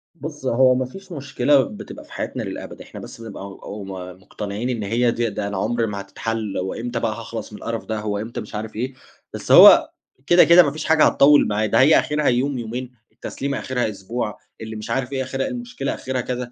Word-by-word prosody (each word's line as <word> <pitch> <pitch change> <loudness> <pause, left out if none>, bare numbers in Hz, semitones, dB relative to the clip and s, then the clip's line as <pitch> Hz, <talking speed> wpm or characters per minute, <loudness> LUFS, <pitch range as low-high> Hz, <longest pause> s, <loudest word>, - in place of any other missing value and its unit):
بُصّ، 150 -4 -8
هو 130 +1 +4
ما 130 0 0
فيش 195 +8 -12
مشكلة 140 -1 +2
بتبقى 105 - -9
في - - -22
حياتنا - - -4
للأبد، - - -7
إحنا - - -10
بس 115 - -10
بنبقى 105 -3 -8
أو 100 +1 -8
م 95 - -8 0.3
مقتنعين 105 +6 -5
إن 115 -4 -2
هي 115 +4 +1
دي 115 0 -1
ده 100 0 -4
أنا 100 -2 -4
عمري 115 +3 0
ما 100 -1 -4
هتتحل، 110 +1 -4
هو 95 +1 -2
امتى 120 0 -4
بقى 115 -2 0
هاخلَص 115 -1 -7
من - - -9
القرف 115 -1 -4
ده؟ 110 -1 -3
هو 105 -1 -2
امتى 110 +3 -5
مش 105 - -10
عارف 110 +1 -5
إيه؟ 125 +4 -3 0.4
بس - - -5
هو - - +9 0.4
كده، 175 +1 +7
كده، 175 +1 +8
ما 145 - 0
فيش 155 +1 -6
حاجة 160 -1 +4
هتطوِّل 145 +1 +5
معاه، 105 +1 0
ده 115 +2 +2
هي 145 +4 +6
آخرها 150 0 -1
يوم 130 +2 +1
يومين، 120 +2 -5 0.2
التسليمة 140 0 -4
آخرها 125 -3 -1
أسبوع، 105 +2 -4 0.2
اللي 110 0 -6
مش 110 - -7
عارف 135 0 -1
إيه 130 -1 -1
آخرها 135 +1 -3
المشكلة 245 0 -4
آخرها 130 -1 -3
كذا. 125 0 -4
120 Hz, 220 wpm, -22 LUFS, 110-135 Hz, 0.4 s, هو